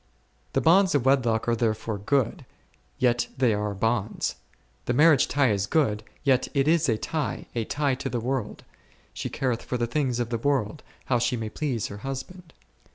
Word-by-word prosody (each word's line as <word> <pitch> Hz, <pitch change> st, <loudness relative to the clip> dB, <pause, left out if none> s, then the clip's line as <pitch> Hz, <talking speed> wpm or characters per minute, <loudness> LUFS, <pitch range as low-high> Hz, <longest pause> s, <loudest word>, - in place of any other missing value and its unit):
The -, -, +2 dB
bonds 185 Hz, +1 st, +4 dB
of 135 Hz, -3 st, +1 dB
wedlock 120 Hz, -5 st, +2 dB
are 120 Hz, -, +2 dB
therefore 110 Hz, -2 st, -1 dB
good, 130 Hz, +5 st, 0 dB, 0.5 s
yet 120 Hz, -1 st, +2 dB
they 125 Hz, -4 st, +3 dB
are 105 Hz, 0 st, -2 dB
bonds; 110 Hz, +1 st, -1 dB, 0.5 s
the 120 Hz, -, 0 dB
marriage 150 Hz, -1 st, +5 dB
tie 140 Hz, -4 st, +2 dB
is 100 Hz, -1 st, 0 dB
good, 110 Hz, -9 st, +1 dB, 0.2 s
yet 135 Hz, -2 st, +3 dB
it 135 Hz, 0 st, +2 dB
is 160 Hz, -3 st, +3 dB
a 110 Hz, -, +2 dB
tie, 150 Hz, +5 st, -3 dB
a 115 Hz, -2 st, -2 dB
tie 145 Hz, +1 st, 0 dB
to 130 Hz, -, -4 dB
the 120 Hz, -, -2 dB
world, 125 Hz, -1 st, -3 dB, 0.5 s
she -, -, -4 dB
careth 125 Hz, -3 st, -1 dB
for 125 Hz, -, -3 dB
the 120 Hz, -, 0 dB
things 125 Hz, -1 st, -1 dB
of 120 Hz, -1 st, -2 dB
the 115 Hz, -, -1 dB
world, 140 Hz, +1 st, 0 dB, 0.2 s
how 125 Hz, -2 st, +1 dB
she 120 Hz, +1 st, 0 dB
may 110 Hz, -1 st, -4 dB
please 130 Hz, -5 st, -2 dB
her 100 Hz, -, -6 dB
husband. 135 Hz, -, -7 dB
125 Hz, 185 wpm, -26 LUFS, 115-140 Hz, 0.5 s, marriage